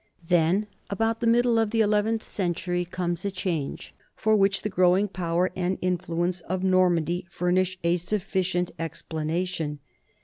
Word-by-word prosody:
Then, 175 +4 +3 0.2
about 225 +3 0
the 235 - 0
middle 235 0 +4
of 225 -2 +2
the 225 +1 +2
eleventh 215 +1 +1
century, 175 -1 -1
comes 175 -1 -3
a 200 - 0
change, 180 -6 -3 0.2
for 220 0 +2
which 195 -1 +2
the - - 0
growing 185 +1 +3
power 180 -1 -1
and 185 +1 -1
in 180 -1 0
fluence 175 +1 -2
of 185 +3 -3
Normandy 180 -2 +2
furnish 180 +2 0
a 170 +1 +3
sufficient 185 -1 -1
explanation. 165 0 -3
180 Hz, 145 wpm, -26 LUFS, 175-200 Hz, 0.2 s, middle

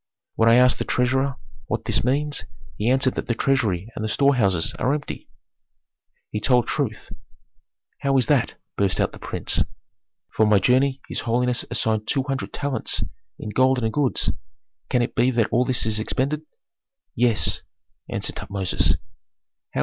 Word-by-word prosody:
When 115 0 +4
I 115 - +7
asked 125 0 +5
the - - 0
treasurer 130 +2 +1 0.3
what - - -2
this - - +1
means, 145 +4 0 0.3
he 110 +3 0
answered 130 0 +3
that - - -4
the 120 - 0
treasury 115 -7 0
and - - -4
the 110 - -1
storehouses 105 - +2
are 135 +3 +2
empty." 145 - -6 1.0
"He 105 - -2
told 125 +1 +3
truth." 120 -7 -3 0.9
"How 135 -1 +2
is 130 - +3
that?" 145 -6 +2 0.2
burst 100 -2 +1
out - - +2
the - - -12
prince. - - -1 0.7
"For 110 - +3
my 105 -1 +5
journey 130 +6 +2
his - - -4
holiness 125 +1 0
assigned 110 -1 -1
two 135 -2 +1
hundred 135 -1 -3
talents 140 -2 -2 0.3
in - - -6
gold 130 +1 +3
and 110 - 0
goods. 145 -4 +1 0.6
Can 125 - +2
it - - -3
be 120 +2 +3
that 120 -4 +1
all 125 - +3
this 125 -3 +1
is 110 -1 0
expended?" 140 +7 -1 0.7
"Yes," 115 -8 +2 0.5
answered - - -3
Tutmosis. 95 -2 0
125 Hz, 155 wpm, -23 LUFS, 110-135 Hz, 1.0 s, I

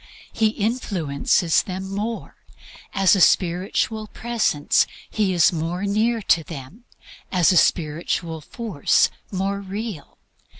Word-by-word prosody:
He 220 - +2
influences 190 - 0
them 190 0 -6
more. 210 +4 -4 0.6
As 195 -1 +4
a 195 - +1
spiritual 190 +5 +2
presence 220 -12 +1 0.2
he 210 -3 0
is 175 -1 +4
more 170 +3 -3
near 220 +3 +1
to 165 -3 +3
them, 165 - -10 0.5
as 180 -2 +4
a - - +2
spiritual 165 0 0
force 200 - +1 0.2
more 195 +1 -1
real. 200 -3 -6
190 Hz, 115 wpm, -22 LUFS, 170-215 Hz, 0.6 s, As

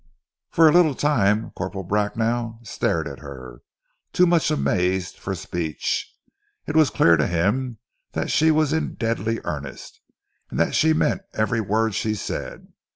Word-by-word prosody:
For 165 -1 +5
a - - +6
little 165 -5 +4
time 110 -8 +1
Corporal 95 0 -5
Bracknell 115 +4 -1
stared 85 -7 -1
at 70 -2 -8
her, 65 -4 -10 0.5
too 180 - +4
much 170 -3 +3
amazed 95 - 0
for 95 - -4
speech. 85 -3 -3 0.5
It 150 - -4
was 155 -4 +5
clear 85 0 +4
to 75 - +1
him 105 +9 0 0.4
that - - -2
she 160 +1 +4
was 155 -1 +2
in 160 - -1
deadly 115 0 -1
earnest 70 -4 -7 0.5
and - - -4
that - - +2
she 160 0 +4
meant 155 - +1
every 110 +1 +1
word 110 +2 0
she 110 +2 -1
said. 105 - -6
110 Hz, 155 wpm, -23 LUFS, 90-145 Hz, 0.5 s, a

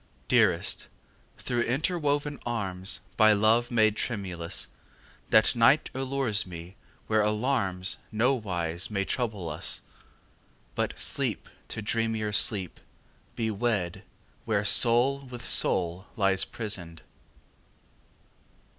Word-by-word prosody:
Dearest, - - +2 0.5
through 120 -1 -2
interwoven 145 +1 -1
arms 95 -5 -2 0.2
By 110 -1 +6
love 110 +3 +2
made 110 -3 +3
tremulous, 95 -8 -2 0.6
That 110 +3 +4
night 120 +6 +4
allures 130 -5 -1
me 85 +1 -10 0.3
where 110 -1 +2
alarms 105 -4 0
Nowise 95 -8 -1
may 100 -2 -1
trouble 110 -9 -3
us; 80 +2 -1 0.9
But - - -2
lseep - - 0 0.3
to 110 - -5
dreamier 110 -1 -1
sleep 100 -4 +2 0.6
be 110 -1 -1
wed 100 -5 -2 0.4
Where 105 -2 0
soul 120 +5 +5
with 125 -2 -8
soul 90 +2 +1
lies 95 -4 +3
prisoned. 90 -7 -4
110 Hz, 100 wpm, -27 LUFS, 95-120 Hz, 0.9 s, By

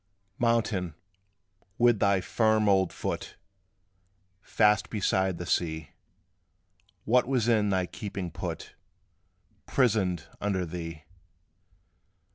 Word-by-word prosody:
Mountain, 110 -8 +1 0.8
with 120 -3 +4
thy 100 -2 +3
firm 110 +2 +2
old 95 -3 +3
foot - - -4 1.1
Fast 105 0 +2
beside 95 -3 0
the 85 - -5
sea, 80 -3 -1 1.1
What 125 +2 +3
was 125 -4 +1
in 110 -3 +3
thy 95 -2 +1
keeping 95 -2 -6
put, - - -6 0.9
Prisoned 100 - +1 0.2
under 95 -3 0
thee? 85 -2 -7
100 Hz, 90 wpm, -28 LUFS, 90-110 Hz, 1.1 s, with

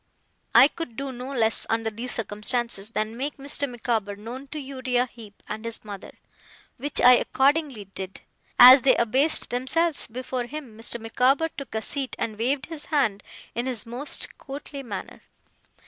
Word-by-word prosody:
I 245 +4 +9
could 300 -7 -8
do 275 0 -4
no 255 +2 -7
less, 225 -4 +2
under 225 0 0
these 240 +3 -5
circumstances, 220 -1 -1
than 220 0 -3
make 275 +4 -4
Mr. 285 0 0
Micawber 225 -4 -2
known 240 +7 -8
to 305 - -8
Uriah 260 -3 -1
Heep 225 -4 -14
and 215 +1 -6
his 230 -1 -4
mother; 200 -2 -9 0.6
which 285 +3 0
I 250 0 +8
accordingly 275 -6 +1
did. 195 0 -8 0.4
As 255 +2 +11
they 265 - +5
abased 265 +7 +3
themselves 285 +6 +1
before 250 +1 -4
him, 265 -4 -8
Mr. 230 +1 -3
Micawber 255 +7 +1
took 275 -6 -9
a 220 - -1
seat, 275 -3 -2
and 220 -2 -4
waved 260 +4 0
his 315 -3 -5
hand 220 -10 0 0.3
in 240 +2 -2
his 250 -3 -3
most 245 +5 -2
courtly 280 +1 -7
manner. 210 -7 -7
250 Hz, 160 wpm, -25 LUFS, 225-275 Hz, 0.6 s, As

